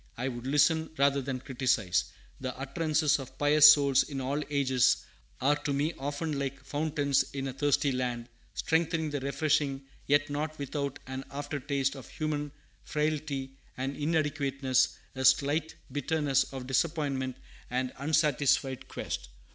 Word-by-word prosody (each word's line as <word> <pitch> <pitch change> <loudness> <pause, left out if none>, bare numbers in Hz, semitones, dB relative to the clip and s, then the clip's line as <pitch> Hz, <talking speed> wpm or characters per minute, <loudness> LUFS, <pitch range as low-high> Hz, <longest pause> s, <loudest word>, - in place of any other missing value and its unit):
I 125 +3 -1
would 120 0 -6
listen, 150 +3 +3
rather 140 0 +3
than 130 -1 -4
criticise. 125 -9 +1 0.3
The 130 -1 -5
utterances 150 +2 +1
of 130 -1 -9
pious 150 +1 +8
souls, 140 -2 +4
in 140 -2 -4
all 135 +3 -1
ages, 130 -3 +2 0.3
are 140 +3 +3
to 145 -1 -2
me 145 +4 0
often 145 +2 -2
like 140 0 -4
fountains 145 -2 +1
in 135 -1 -3
a 130 - -4
thirsty 145 +1 +2
land, 125 -2 -2 0.3
strengthening 160 -1 0
and 140 -2 -2
refreshing, 140 0 0 0.2
yet 145 +1 +3
not 155 +1 -3
without 140 -1 -3
an 130 0 -5
after 145 +1 -4
taste 140 0 0
of 135 -3 -10
human 150 -2 -3 0.3
frailty 150 -3 -2 0.2
and 135 +2 -3
inadequateness, 140 -4 +1 0.2
a 130 - -4
slight 145 +4 +3 0.2
bitterness 145 -1 +1
of 130 -2 -6
disappointment 135 -2 -1 0.3
and 125 +1 -1
unsatisfied 140 -3 +1
quest. - - -5
140 Hz, 140 wpm, -30 LUFS, 135-150 Hz, 0.3 s, pious